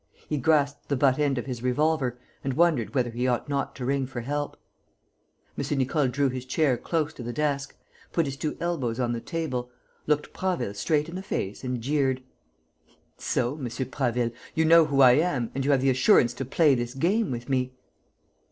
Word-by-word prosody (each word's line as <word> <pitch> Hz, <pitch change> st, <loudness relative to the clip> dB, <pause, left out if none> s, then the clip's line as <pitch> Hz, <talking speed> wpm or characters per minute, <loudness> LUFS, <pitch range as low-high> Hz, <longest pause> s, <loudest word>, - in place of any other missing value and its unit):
He 150 Hz, -, -1 dB
grasped 145 Hz, 0 st, +1 dB
the 140 Hz, -, +2 dB
butt 130 Hz, +1 st, +3 dB
end 140 Hz, -3 st, +1 dB
of 120 Hz, -, -3 dB
his 125 Hz, -3 st, -5 dB
revolver 130 Hz, 0 st, +1 dB, 0.3 s
and 135 Hz, -1 st, -2 dB
wondered 145 Hz, -, +2 dB
whether 125 Hz, -3 st, +1 dB
he 120 Hz, +2 st, -1 dB
ought 125 Hz, +2 st, 0 dB
not 140 Hz, -1 st, -2 dB
to 125 Hz, -, -5 dB
ring 135 Hz, 0 st, 0 dB
for 125 Hz, -2 st, -5 dB
help. 145 Hz, +4 st, -3 dB, 1.0 s
M. 140 Hz, +1 st, -2 dB
Nicole 135 Hz, +2 st, +1 dB
drew 140 Hz, +3 st, +1 dB
his 130 Hz, -1 st, -3 dB
chair 130 Hz, +1 st, +1 dB
close 155 Hz, +4 st, -2 dB
to -, -, -10 dB
the 120 Hz, 0 st, -4 dB
desk, 145 Hz, 0 st, -1 dB, 0.4 s
put 165 Hz, -, +1 dB
his 135 Hz, -1 st, -4 dB
two 150 Hz, +2 st, -3 dB
elbows 135 Hz, -9 st, -2 dB
on 120 Hz, -1 st, 0 dB
the 115 Hz, -, -4 dB
table, 135 Hz, -8 st, -3 dB, 0.4 s
looked 150 Hz, -1 st, 0 dB
Prasville 185 Hz, -, -2 dB
straight 150 Hz, +9 st, 0 dB
in 170 Hz, -, -8 dB
the 185 Hz, -, -4 dB
face 105 Hz, -, -4 dB
and 125 Hz, -2 st, -3 dB
jeered: 135 Hz, 0 st, 0 dB, 1.0 s
"So, 125 Hz, -2 st, 0 dB
M. 135 Hz, -5 st, -4 dB
Prasville, 120 Hz, -1 st, -1 dB, 0.2 s
you 160 Hz, -, +3 dB
know 165 Hz, 0 st, +7 dB
who 140 Hz, -2 st, +2 dB
I 130 Hz, -2 st, +9 dB
am 135 Hz, -4 st, +1 dB
and 135 Hz, -, -2 dB
you 140 Hz, -, 0 dB
have 135 Hz, -2 st, +4 dB
the 135 Hz, 0 st, +3 dB
assurance 125 Hz, -1 st, +4 dB
to 135 Hz, -, -5 dB
play 145 Hz, +3 st, +4 dB
this 120 Hz, 0 st, -2 dB
game 190 Hz, +9 st, +1 dB
with 120 Hz, -2 st, -5 dB
me?" 130 Hz, -1 st, -1 dB
135 Hz, 200 wpm, -26 LUFS, 125-150 Hz, 1.0 s, I